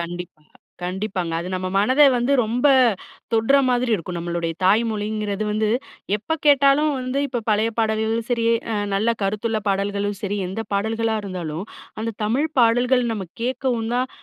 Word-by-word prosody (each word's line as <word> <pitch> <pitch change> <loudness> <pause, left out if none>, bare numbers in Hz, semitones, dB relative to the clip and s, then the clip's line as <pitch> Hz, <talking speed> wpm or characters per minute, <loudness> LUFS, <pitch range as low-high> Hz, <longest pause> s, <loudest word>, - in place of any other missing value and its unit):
கண்டிப்பா, 170 -2 -7 0.4
கண்டிப்பாங்க. 185 -2 -3
அது 180 - -5
நம்ம 185 0 -2
மனத 255 +8 +4
வந்து 245 +3 +1
ரொம்ப 240 +6 +1 0.7
தொட்ற 225 +5 +4
மாதிரி 245 -1 +1
இருக்கும். 175 -2 -4
நம்மளுடைய 170 -1 -2
தாய்மொழிங்கிறது 215 0 0
வந்து 215 0 0 0.5
எப்ப 320 +10 -3
கேட்டாலும் 285 +1 +5
வந்து 255 +2 -2
இப்போ 245 -2 -2
பழைய 215 +2 +2
பாடல்களும் 220 +1 0
சரி. 230 -1 +1 0.3
அ - - 0 0.2
நல்ல 220 +4 +1
கருத்துள்ள 215 +2 -1
பாடல்களும் 200 0 -1
சரி 205 0 -2
எந்த 225 +4 -4
பாடல்களா 220 +2 0
இருந்தாலும், 175 -3 -5 0.4
அந்த 225 +1 -2
தமிழ் 265 +9 +1
பாடல்கள் 245 +2 +3
நம்ம 195 -4 -4 0.2
கேட்கவும் 245 -2 -1
தான் 255 +1 0
220 Hz, 145 wpm, -22 LUFS, 195-240 Hz, 0.7 s, கேட்டாலும்